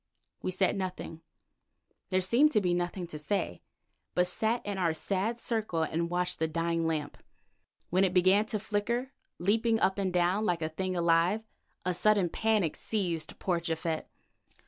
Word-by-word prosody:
We - - -2
said 185 +2 +1
nothing; 185 -3 -5 0.9
there 185 -1 +2
seemed 240 +11 +4
to 215 - +5
be 180 -3 +1
nothing 175 +1 -2
to 155 -3 -8
say, 160 - -2 0.5
but 180 - +4
sat 220 +6 0
in 200 -2 -3
our 165 -3 +1
sad 200 +7 -1
circle 220 -9 -1
and 170 +2 -1
watched 180 0 -1
the 160 - +1
dying 165 +1 0
lamp. 155 -3 -3 0.7
When 185 +2 +4
it 190 - +3
began 190 +4 +4
to 215 -1 -1
flicker, 235 +6 -1 0.3
leaping 225 +5 +2
up 190 0 +2
and 190 -2 0
down 180 +4 +2
like 175 -6 0
a 155 - -1
thing 185 +3 -3
alive, 170 +5 +3 0.4
a 180 - +1
sudden 200 0 +3
panic 215 -3 +1
seized 175 -7 -2
poor 180 -3 0
Japhet. 165 -1 -3
185 Hz, 165 wpm, -30 LUFS, 170-205 Hz, 0.9 s, to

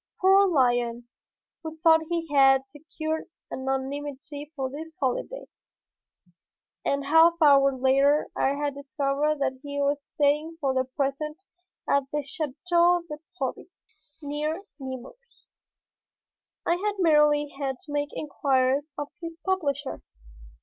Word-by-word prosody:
Poor 390 +1 +6
lion, 245 -6 +1 0.5
who 320 -1 -7
thought 320 0 +5
he 335 -1 -2
had 270 -1 +5
secured 315 +3 -5 0.3
anonymity 280 +2 -4
for 265 -2 -3
his 320 +3 -8
holiday! 270 - -2 1.4
A 280 0 0
half 325 +3 +6
hour 280 -3 +6
later 275 +3 +3
I 275 +1 +1
had 290 0 -2
discovered 280 +2 -1
that 260 -1 -1
he 285 -1 -5
was 285 0 0
staying 300 +3 +1
for 275 -4 0
the 260 0 +1
present 290 +6 -3 0.4
at 280 -1 +2
the 295 0 -1
Château 340 +3 +1
de 300 -2 -7 0.2
Proby, 265 +4 -3 0.6
near 300 +5 -3 0.2
Nemours. 265 - -10 1.2
I 345 - +2
had 415 +2 -1
merely 300 -4 +4
had 275 -2 -4
to 300 - -11
make 290 0 -1
inquiries 275 0 0
of 290 -1 -4
his 330 -1 -7
publisher. 290 -8 -1
290 Hz, 120 wpm, -26 LUFS, 275-320 Hz, 1.4 s, Poor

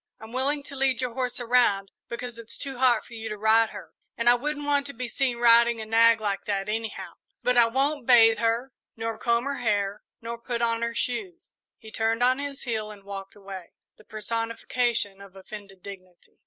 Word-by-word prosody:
I'm 220 0 -11
willing 280 +3 0
to 280 - -10
lead 265 -2 +1
your 250 -2 -1
horse 250 0 -2
around, 230 -5 +2 0.2
because 235 0 -6
it's 230 -1 -8
too 270 -3 -4
hot 245 -4 +3
for - - -14
you 225 -1 -6
to 210 - -5
ride 220 +1 +4
her, 205 -2 -10 0.2
and 230 - -1
I 240 - +9
wouldn't 290 +4 -2
want 285 -1 +1
to 280 - -7
be 250 +1 -4
seen 250 0 -1
riding 235 0 +5
a 220 - -5
nag 230 +1 +5
like 205 -2 -2
that 195 -1 -2
anyhow; 220 +1 -4 0.3
but 250 - +2
I 240 -1 +6
won't 270 +2 0
bathe 225 -3 +6
her 235 +3 0 0.2
nor 225 0 -3
comb 235 +1 +1
her 280 0 -3
hair 205 -3 0 0.2
nor 235 0 -6
put 235 0 -3
on 230 0 +1
her 235 0 -2
shoes." 350 +7 -3 0.2
He 220 - -13
turned 225 +2 0
on 255 +2 +3
his 285 -1 -5
heel 220 -4 -3
and 205 -2 -12
walked 195 -1 -8
away, 195 -3 -10 0.2
the - - -18
personification 225 -1 -2
of 195 -1 -14
offended 195 -1 -11
dignity. 185 -3 -13
230 Hz, 205 wpm, -26 LUFS, 215-250 Hz, 0.3 s, I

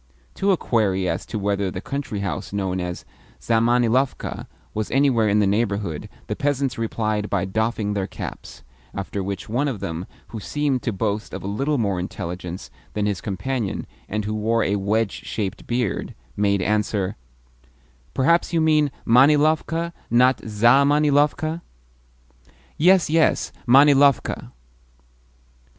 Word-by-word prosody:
To 195 +1 +1
a 185 - +3
query 95 -8 +1
as 85 +1 -3
to 110 - -4
whether 100 -1 0
the 90 - -5
country 135 -3 -4
house 90 -7 -4
known 95 -2 -2
as 90 -1 -5 0.3
Zamanilovka 120 +3 +1 0.3
was 110 -1 -2
anywhere 130 -6 +3
in 100 - +3
the 105 - +3
neighbourhood 100 -5 -1 0.2
the - - -3
peasants 140 -3 0
replied 110 -2 -2
by 95 -2 0
doffing 110 +1 -1
their 100 -2 -2
caps; 95 - -8 0.3
after 100 0 -4
which 95 -1 -4
one 125 +7 0
of 125 -7 -3
them 85 +2 -5 0.2
who 110 - -6
seemed 135 - -1
to 115 - -1
boast 105 +1 -2
of - - -7
a - - -4
little 135 +9 0
more 100 -6 0
intelligence 90 0 -6 0.2
than 105 -1 -1
his 100 -4 -1
companion, 105 +2 -3 0.2
and 105 0 -2
who 105 - -2
wore 110 +1 +1
a 100 - +1
wedge 105 +2 -1
shaped 100 -4 -4
beard, 120 -4 -2 0.2
made 100 -2 +1
answer: 105 -1 0 1.0
"Perhaps 170 +8 +3
you 165 - +3
mean 155 -2 +3 0.2
Manilovka 155 +6 +3 0.2
not 125 +2 +4
ZAmanilovka?" 145 +7 +3 1.1
"Yes, 180 +3 +4
yes 160 +1 +2 0.2
Manilovka." 140 +1 +4
110 Hz, 135 wpm, -23 LUFS, 100-140 Hz, 1.1 s, not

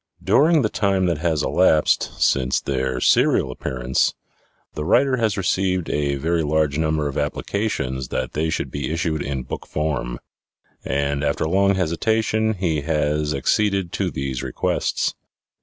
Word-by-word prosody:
During 145 - +4
the 110 - +1
time 95 -2 +1
that 85 -4 0
has 80 -3 0
elapsed 75 -1 +2
since 65 -1 +2
their 65 -2 -2
serial - - +3
appearance, 65 0 -1 0.6
the 75 - -4
writer 130 - +3
has 110 -3 0
received 95 -1 0
a 70 -1 0
very 80 +4 0
large 75 -1 +1
number 80 -2 0
of 70 - -3
applications 70 - -2
that 65 0 -3
they 80 +2 0
should - - -3
be 70 0 -3
issued 80 -2 -1
in 70 -2 -3
book - - -7
form; 70 -6 -2 0.7
and 70 +1 -1
after 75 +2 0
long 100 +3 +3
hesitation, 110 +5 0
he 85 -6 -1
has 75 0 0
acceded 100 +5 +1
to - - -1
these 65 -2 -4
requests. 65 -2 -1
80 Hz, 145 wpm, -22 LUFS, 70-95 Hz, 0.7 s, During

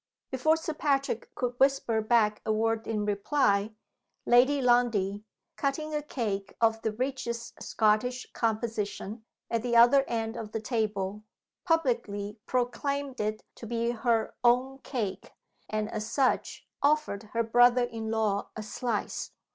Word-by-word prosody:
Before 310 +5 +3
Sir 320 0 -4
Patrick 275 -6 0
could 245 0 -3
whisper 270 -5 +3
back 215 -1 +2
a 220 - 0
word 225 +1 0
in 215 -2 -1
reply, 205 0 +1 0.5
Lady 260 +4 +5
Lundie, 230 -6 +2 0.3
cutting 305 +2 -2
a 300 - 0
cake 210 -9 -3
of 225 -1 +2
the 220 - -1
richest 235 0 -4
Scottish 225 +4 +1
composition, 220 -1 -2 0.3
at 230 -1 +1
the 240 0 -1
other 245 +4 +7
end 225 0 -2
of 220 -2 -7
the 225 - -1
table, 210 -3 -2 0.4
publicly 230 - 0
proclaimed 270 +2 -1
it 215 +1 -2
to 230 - -10
be 235 +1 0
her 230 -1 0
"own 255 +3 +3
cake," 210 -9 -4 0.4
and, 215 0 -1
as 215 0 -4
such, 270 -2 0
offered 290 -8 +2
her 230 0 +2
brother 245 +2 +5
in 225 -2 -4
law 215 -2 0
a 215 - -5
slice. 215 +1 -3
230 Hz, 140 wpm, -29 LUFS, 215-255 Hz, 0.5 s, other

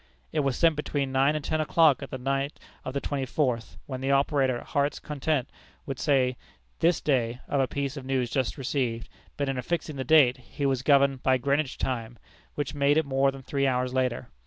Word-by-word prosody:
It 155 - 0
was 135 -3 0
sent 165 -2 +4
between 145 -2 -2
nine 135 +3 +3
and 150 - -3
ten 155 0 0
o'clock 155 -3 +4
at 130 - -6
night 135 +2 -2 0.2
of 130 - -6
the - - +1
twenty 135 -2 -3
fourth, 125 -5 -1
when 130 -2 -6
the 135 - -1
operator 140 -2 +2
at - - -10
Heart's 145 +1 0
Content 150 -2 -2 0.4
would 135 -3 -5
say 130 -4 +2 0.4
this 170 0 +3
day 125 -4 0
of 140 - 0
a 130 - +1
piece 140 +1 -3
of 135 - -6
news 130 -3 -1
just 130 +2 -1
received, 125 -4 -2 0.3
but 140 - -1
in 135 -1 -1
affixing 155 +2 -3
the 130 - -2
date, 130 -2 +5
he 140 - -5
was 135 -2 +1
governed 140 -1 +3
by 130 -1 +3
Greenwich 140 +2 0
time, 120 -2 -3 0.4
which 145 -2 -3
made 145 +1 +3
it 160 - +2
more 135 0 +2
than 135 -1 -7
three 140 +1 0
hours 125 -1 0
later. 125 -2 -1
135 Hz, 205 wpm, -27 LUFS, 130-145 Hz, 0.4 s, date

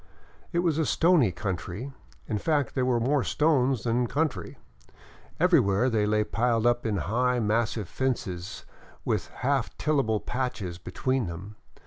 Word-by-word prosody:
It 170 0 +1
was 160 -2 +1
a 160 - +2
stony 165 - +4
country, 95 - -5 0.3
in 105 -3 -1
fact 145 0 0
there 130 -1 0
were 120 -2 +2
more 135 +3 +1
stones 135 -6 +2
than 120 +1 +1
country. 150 +3 -2 0.8
Everywhere 130 - +3
they 105 -2 +1
lay 105 0 +2
piled 115 +1 0
up 120 -1 +2
in 105 -2 0
high 125 +8 +1
mas 110 0 +1
sive 105 -6 -5
fences 100 -7 -3 0.4
with - - 0
half 135 -2 -1
tillable 135 -8 +1
patches 110 -10 -4
between 130 +5 -1
them. 95 +5 -8
120 Hz, 145 wpm, -27 LUFS, 105-135 Hz, 0.8 s, stony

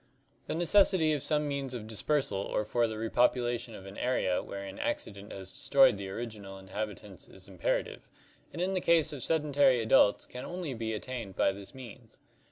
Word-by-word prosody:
The - - -2
necessity 175 -2 +4
of 145 - -1
some 150 0 +1
means 140 -3 -3
of 110 -3 -6
dispersal 115 0 0
or 105 +2 -1
for 120 +2 +1
the 110 -1 -5
repopulation 120 0 +1
of 95 - -10
an 95 0 -9
area 125 -8 +1
wherein 100 -1 -7
accident 100 -1 -3
has 95 -1 -7
destroyed 135 -6 +4
the 100 -1 -5
original 105 -2 -6
inhabitants. 100 0 -6
is 95 +1 -10
imperative, 95 -3 -2 0.4
and 160 - -8
in 185 +2 0
the 185 - 0
case 165 -3 +3
of 140 - -6
sedentary 145 -4 +3
adults 110 -2 +4
can 125 - -8
only 175 -5 -4
be 110 -2 -3
at 105 - -6
tained 120 -7 -6
by - - +3
this 100 +6 -9
means. 120 -3 -12
120 Hz, 180 wpm, -30 LUFS, 100-140 Hz, 0.4 s, necessity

